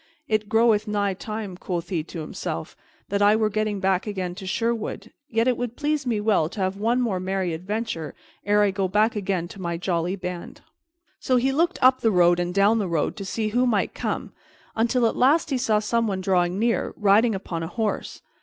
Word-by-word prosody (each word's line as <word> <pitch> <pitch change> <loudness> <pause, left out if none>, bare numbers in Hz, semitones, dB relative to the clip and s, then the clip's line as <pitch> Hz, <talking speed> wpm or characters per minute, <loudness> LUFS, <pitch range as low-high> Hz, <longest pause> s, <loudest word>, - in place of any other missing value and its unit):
"It 215 -1 0
groweth 220 -1 +3
nigh 205 -2 0
time," 210 0 -6
quoth 180 -1 -4
he 170 -5 -1
to 170 - -7
himself, 80 - -5 0.3
"that 200 0 0
I 205 +1 +6
were 215 -1 +1
getting 215 -1 -1
back 190 +1 +1
again 185 -4 -3
to 190 +1 -8
Sherwood; 230 +2 -2 0.2
yet 230 +1 +1
it 250 - +2
would 245 -1 -4
please 295 -2 -1
me 225 -3 +1
well 205 -7 +2
to 205 - -9
have 190 0 0
one 230 +5 +1
more 210 -7 0
merry 185 -1 -1
adventure 185 -1 -4 0.3
ere 205 +1 +3
I 205 - +3
go 195 -1 -1
back 210 +4 +2
again 190 -4 -1
to 195 - -10
my 170 -1 -2
jolly 175 +1 -1
band." 180 -2 -7 0.6
So 255 - +1
he 255 +2 +2
looked 335 +6 +1
up 255 0 +5
the 225 - +3
road 175 -3 +4
and 175 0 -1
down 200 +4 +3
the 200 - -1
road 165 -3 -1
to 200 - -5
see 215 +3 -2
who 245 +4 +2
might 215 -4 +1
come, - - -4 0.4
until 235 +2 +2
at 225 - +1
last 295 +5 +3
he 265 - +2
saw 220 -4 +2
someone 210 -2 0
drawing 180 -1 +1
near, 230 +2 0
riding 210 +2 +4
upon 175 -3 -4
a 165 - -3
horse. 215 +5 -3
205 Hz, 210 wpm, -24 LUFS, 185-225 Hz, 0.6 s, I